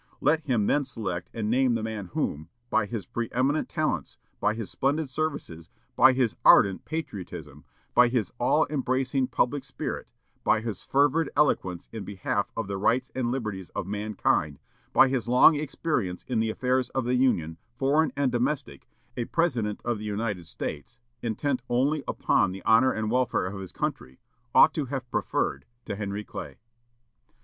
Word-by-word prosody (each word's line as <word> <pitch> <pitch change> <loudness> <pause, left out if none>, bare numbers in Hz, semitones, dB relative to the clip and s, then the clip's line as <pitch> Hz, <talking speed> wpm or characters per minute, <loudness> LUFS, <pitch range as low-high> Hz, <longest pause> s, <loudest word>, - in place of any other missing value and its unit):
Let 155 +3 +3
him 120 -7 +1
then 145 +6 +2
select 90 -9 -4
and 110 -2 -3
name 125 +1 +3
the 115 - -2
man 110 -4 -4
whom, 75 +2 -2 0.2
by 105 - +2
his 105 -3 -4
preëminent 130 +6 0
talents, - - -2 0.2
by 105 - +1
his 115 -3 -5
splendid 145 +1 0
services, 130 - -4 0.3
by 130 - +7
his 125 -4 +1
ardent 95 -1 +6
patriotism, 90 - -6 0.3
by 125 0 +6
his 120 -6 -1
all 150 +6 +3
embracing 130 -1 0
public 135 +3 0
spirit, 135 - -5 0.3
by - - +3
his 110 -4 -5
fervid 145 +3 +2
eloquence 95 - +1
in 110 -3 -6
behalf 100 +1 -2
of 115 - -1
the 100 0 -4
rights 120 +5 +1
and 125 -2 -1
liberties 105 -8 -4
of - - -2
mankind, 100 -7 0 0.3
by - - +6
his 130 -3 -1
long 125 +6 +7
experience 145 - -2
in 120 -3 0
the 110 0 +1
affairs 125 +2 0
of 130 -2 0
the 125 - 0
Union, 85 -11 +1 0.2
foreign 145 +3 +2
and 140 -3 +2
domestic, 130 +4 -2 0.3
a 120 - -2
President 120 -12 0
of 120 -3 -1
the - - -7
United 105 -4 -3
States, 80 +9 -6 0.2
intent 125 +3 -1
only 135 +5 +1
upon 90 - +2
the 95 +1 -8
honor 130 +4 +5
and 110 0 -2
welfare 125 -6 +1
of 95 +1 -5
his 95 - -8
country, 65 0 -4 0.4
ought - - +7
to 150 - -1
have 130 -1 -4
preferred 70 -1 -1 0.2
to - - -4
Henry 100 0 -4
Clay." 90 - -8
120 Hz, 165 wpm, -27 LUFS, 100-135 Hz, 0.4 s, by